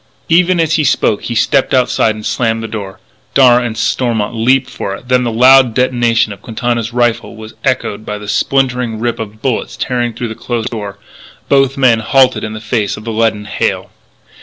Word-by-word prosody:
Even 175 +1 +3
as 160 -1 +2
he 155 - +1
spoke 110 -6 +1
he 120 - -3
stepped 135 +3 +2
outside 120 -3 +2
and 105 0 -9
slammed 115 -2 -1
the - - -4
door; 100 -3 -7
and - - -37
Darragh 125 -2 +5
and 110 -1 -6
Stormont 115 -4 -1
leaped 125 +3 +2
for 100 -5 -5
it. 120 - -14
Then 125 0 +3
the 120 - -1
loud 125 0 +5
detonation 120 -3 +1
of 100 - -15
Quintana's 115 +1 -2
rifle 120 -2 -1
was 110 0 -10
echoed 125 -5 -1
by 105 -1 -5
the 105 0 -10
splintering 125 0 0
rip 120 0 -2
of 110 -1 -8
bullets 130 -4 -2
tearing 120 -2 -2
through 120 -1 -4
the - - -5
closed 115 0 -4
door; 105 -4 -6 0.4
and - - -36
both 135 -1 +2
men 125 -4 +4
halted 130 +3 +2
in 110 - -4
the 110 - -6
face 110 -2 -2
of 105 - -10
the 115 - -4
leaden 110 -2 0
hail. 105 - -2
120 Hz, 205 wpm, -14 LUFS, 110-125 Hz, 0.4 s, Darragh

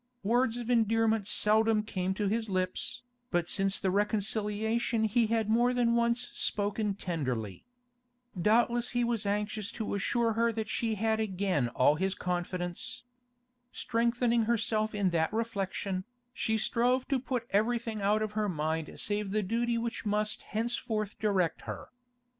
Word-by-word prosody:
Words 235 +2 +2
of 240 0 -3
endearment 225 -2 +2
seldom 215 +1 +3
came 190 -3 -2
to 205 0 0
his 220 +2 -1
lips, 185 +3 -2 0.3
but 175 -2 0
since 195 +1 +1
the 190 - 0
reconciliation 215 +3 0
he 220 +1 +2
had 225 -1 +1
more 240 +3 +3
than 235 -1 +3
once 235 +1 +1
spoken 205 0 -1
tenderly. 130 - -3 0.7
Doubtless 235 +6 +2
he 245 - +3
was 235 -3 -1
anxious 210 +1 -2
to 220 - -3
assure 230 +3 +1
her 230 +1 +2
that 220 -1 -3
she 225 +1 -1
had 220 +1 +1
again 190 - 0
all 130 +5 +3
his 190 +3 0
confidence. 175 +2 -3 0.7
Strengthening 235 0 +1
herself 220 -1 0
in 200 -3 +1
that 160 -1 +1
reflection, 195 -4 -2 0.3
she 220 -4 0
strove 245 +4 +1
to 270 - +2
put 250 -2 -3
everything 225 +1 0
out 210 +2 +2
of 215 - -3
her 210 -1 -1
mind 160 -1 -2
save 205 -1 -1
the 210 +2 0
duty 235 +4 0
which 230 0 -3
must 210 0 0
henceforth 220 -2 -2
direct 195 -6 +1
her. - - -6
215 Hz, 145 wpm, -30 LUFS, 195-230 Hz, 0.7 s, seldom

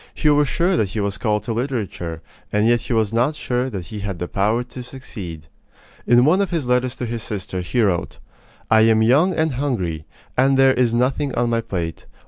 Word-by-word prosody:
He 150 - +3
was 145 0 +3
sure 175 +7 +1
that 100 - +1
he 105 - -4
was 100 -1 -2
called 105 -3 0
to 115 - -3
literature, 110 - -3 0.3
and 105 +1 +2
yet 120 0 +3
he - - -7
was 110 -2 +1
not 125 +7 +1
sure 125 -2 -1
that 95 -7 -6
he 105 +5 -7
had 100 -2 -4
the 90 - -4
power 110 +6 0
to 125 +1 -9
succeed. 105 - -8 0.6
In 120 +1 +5
one 180 +7 +4
of 200 - 0
his 165 -6 -2
letters 125 +1 +1
to 125 - -4
his 115 -1 -4
sister, 95 -3 -4
he 115 +7 0
wrote: 90 -5 -1 0.5
I 110 0 +6
am 110 0 +4
young 155 +11 +4
and 160 -2 +1
hungry, 100 - -2 0.3
and 135 +1 +3
there 135 0 +6
is 125 -2 +2
nothing 130 +3 0
on 120 0 +1
my 115 0 +1
plate. 85 -6 -5
120 Hz, 215 wpm, -21 LUFS, 100-130 Hz, 0.6 s, I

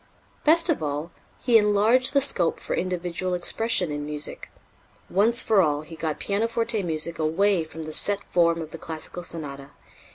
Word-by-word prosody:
Best 330 +3 +5
of 330 - 0
all, 150 +2 -4 0.3
he 235 -3 +5
enlarged 220 +6 +3
the 280 - +4
scope 185 -11 +2
for - - -5
individual 180 0 -3
expression 180 -1 +1
in 145 0 -4
music. 150 0 -5 0.6
Once 225 +5 +3
for 210 -3 +3
all, 150 -3 0
he 165 +1 -11
got 160 -2 -3
pianoforte 230 +2 0
music 165 -1 -3
away 175 +4 +1
from 160 0 -9
the 155 0 -7
set 200 +4 +2
form 170 -1 +2
of 155 - -11
the 165 - -9
classical 160 +2 -6
sonata. 145 -5 -7
175 Hz, 165 wpm, -24 LUFS, 160-215 Hz, 0.6 s, Best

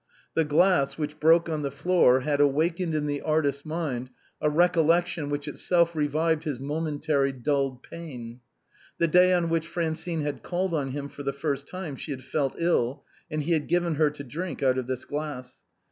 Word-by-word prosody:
The 165 - +3
glass, 150 -1 +3
which 150 0 -4
broke 165 +2 +5
on 155 -2 -2
the 140 - -1
floor, 140 -3 +3
had 145 +1 +1
awakened 160 +4 +1
in 150 -1 0
the 145 -1 -2
artist's 145 -3 0
mind 150 -6 -3 0.3
a 150 - +3
recollection 170 -1 +2
which 145 0 -3
itself 170 +2 +1
revived 155 +1 +1
his 150 -6 -3
momen 145 +2 -3
tarily 140 -3 +1
dulled 135 -3 0
pain. 125 -8 -9 0.6
The 170 - +2
day 180 +3 +5
on 175 -2 +2
which 165 0 0
Francine 165 -1 -2
had 145 -1 -3
called 185 0 -2
on 140 -4 0
him 140 +1 -4
for 145 - -10
the 140 -1 -1
first 140 -1 -3
time 180 -6 -6
she - - -8
had 130 -2 -5
fallen 135 +1 -1
ill, 145 -7 +1 0.3
and 155 -2 -2
he 170 - -2
had 155 -3 +1
given 175 -1 +1
her 150 0 +3
to 145 -1 -9
drink 160 +5 -5
out 130 -1 +3
of 125 - -5
this 130 -1 -3
glass. 145 -4 -5
150 Hz, 190 wpm, -27 LUFS, 140-165 Hz, 0.6 s, broke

